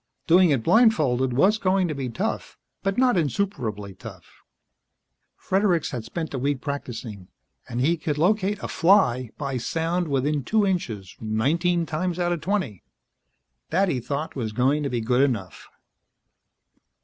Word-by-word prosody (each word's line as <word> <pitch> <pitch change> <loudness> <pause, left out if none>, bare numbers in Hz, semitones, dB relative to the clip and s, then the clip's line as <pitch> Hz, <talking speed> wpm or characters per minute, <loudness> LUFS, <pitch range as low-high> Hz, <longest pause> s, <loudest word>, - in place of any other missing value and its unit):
Doing 180 +1 +5
it 135 -6 +1
blindfolded 155 - +3
was 195 - +3
going 190 -2 +2
to 155 - -2
be 135 -3 -4
tough, 115 - -4 0.2
but 195 +1 -1
not 250 -4 +3
insuperably 120 - -2
tough. - - -13 0.9
Fredericks 185 -4 0
had 120 -4 -4
spent 165 -3 -5
a 130 - -2
week 140 +1 0
practicing, 120 -8 -6 0.4
and 120 - -3
he 160 +7 +2
could 150 -2 -3
locate 200 +4 +2
a - - -2
fly 145 - +3
by 140 -3 -3
sound 165 +7 -1
within 140 +1 0
two 215 - +2
inches, 115 - -3
nineteen 165 +11 +1
times 170 +3 -2
out 175 -1 0
of 170 -3 -2
twenty. 175 - -2 0.9
That, 190 +3 +2
he 130 - 0
thought, 140 +6 -4
was 110 -5 -3
going 135 +6 +2
to 140 - -1
be 120 -2 -2
good 125 +3 +2
enough. 110 - -2
150 Hz, 150 wpm, -24 LUFS, 125-180 Hz, 0.9 s, Doing